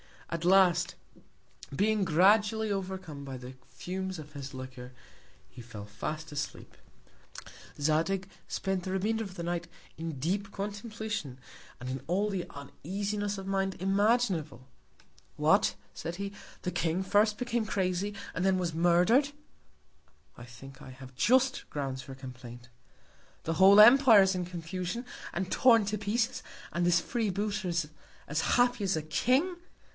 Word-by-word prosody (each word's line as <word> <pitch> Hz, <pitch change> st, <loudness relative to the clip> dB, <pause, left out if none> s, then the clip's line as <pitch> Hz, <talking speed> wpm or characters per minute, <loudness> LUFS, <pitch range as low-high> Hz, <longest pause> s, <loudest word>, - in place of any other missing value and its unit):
At 170 Hz, 0 st, -3 dB
last, 185 Hz, -1 st, +4 dB, 0.8 s
being 210 Hz, +3 st, +2 dB
gradually 205 Hz, +5 st, +3 dB
overcome 185 Hz, -7 st, -4 dB
by 135 Hz, -1 st, -6 dB
the 125 Hz, +1 st, -9 dB
Fumes 185 Hz, +8 st, -5 dB
of 150 Hz, -1 st, -10 dB
his 140 Hz, -1 st, -7 dB
Liquor, 130 Hz, -1 st, -9 dB, 0.6 s
he 125 Hz, -, -11 dB
fell 110 Hz, -3 st, -9 dB
fast 155 Hz, +10 st, -5 dB
asleep. 145 Hz, 0 st, -6 dB, 1.0 s
Zadig 165 Hz, +6 st, +1 dB, 0.2 s
spent 190 Hz, -2 st, -2 dB
the 185 Hz, -, -3 dB
Remainder 220 Hz, +4 st, 0 dB
of 190 Hz, -2 st, -10 dB
the 170 Hz, -, -5 dB
Night 170 Hz, 0 st, -2 dB, 0.3 s
in 165 Hz, 0 st, -4 dB
deep 195 Hz, +7 st, -1 dB
Contemplation, 205 Hz, -, -5 dB, 0.4 s
and 125 Hz, -, -6 dB
in 130 Hz, +1 st, -4 dB
all 195 Hz, +5 st, +1 dB
the 190 Hz, -4 st, -3 dB
Uneasiness 200 Hz, +8 st, -4 dB
of 195 Hz, -, -7 dB
Mind 195 Hz, 0 st, -1 dB
imaginable. 195 Hz, -, +1 dB, 0.7 s
What, -, -, +3 dB, 0.2 s
said 165 Hz, +2 st, -5 dB
he, 200 Hz, +1 st, -4 dB, 0.3 s
the 180 Hz, -, -2 dB
King 175 Hz, +1 st, 0 dB
first 210 Hz, +2 st, +3 dB
became 235 Hz, -2 st, -1 dB
crazy, 190 Hz, +1 st, -1 dB, 0.2 s
and 180 Hz, -, -2 dB
then 190 Hz, -1 st, +3 dB
was 175 Hz, -3 st, -2 dB
murder'd. 180 Hz, -, +3 dB, 1.1 s
I 120 Hz, -, -10 dB
think 135 Hz, +2 st, -13 dB
I 130 Hz, -, -10 dB
have 130 Hz, 0 st, -12 dB
just 260 Hz, -, +2 dB
Grounds 135 Hz, -3 st, -4 dB
for 135 Hz, +1 st, -10 dB
Complaint. 125 Hz, -2 st, -10 dB, 0.7 s
The 165 Hz, -, -2 dB
whole 195 Hz, +3 st, +8 dB
Empire 235 Hz, -1 st, +8 dB
is 190 Hz, 0 st, +2 dB
in 180 Hz, -1 st, -2 dB
Confusion, 180 Hz, +6 st, -5 dB, 0.3 s
and 185 Hz, +1 st, -3 dB
torn 230 Hz, -4 st, +5 dB
to 210 Hz, +2 st, -2 dB
Pieces, 225 Hz, +4 st, -1 dB, 0.3 s
and 175 Hz, 0 st, 0 dB
this 175 Hz, 0 st, +4 dB
Free 230 Hz, -3 st, -1 dB
booter 200 Hz, 0 st, -2 dB
is 170 Hz, -3 st, -1 dB, 0.4 s
as 150 Hz, +2 st, 0 dB
happy 245 Hz, -3 st, +2 dB
as 190 Hz, -, +1 dB
a 155 Hz, -, -2 dB
King. 260 Hz, -, +1 dB
185 Hz, 145 wpm, -30 LUFS, 155-205 Hz, 1.1 s, whole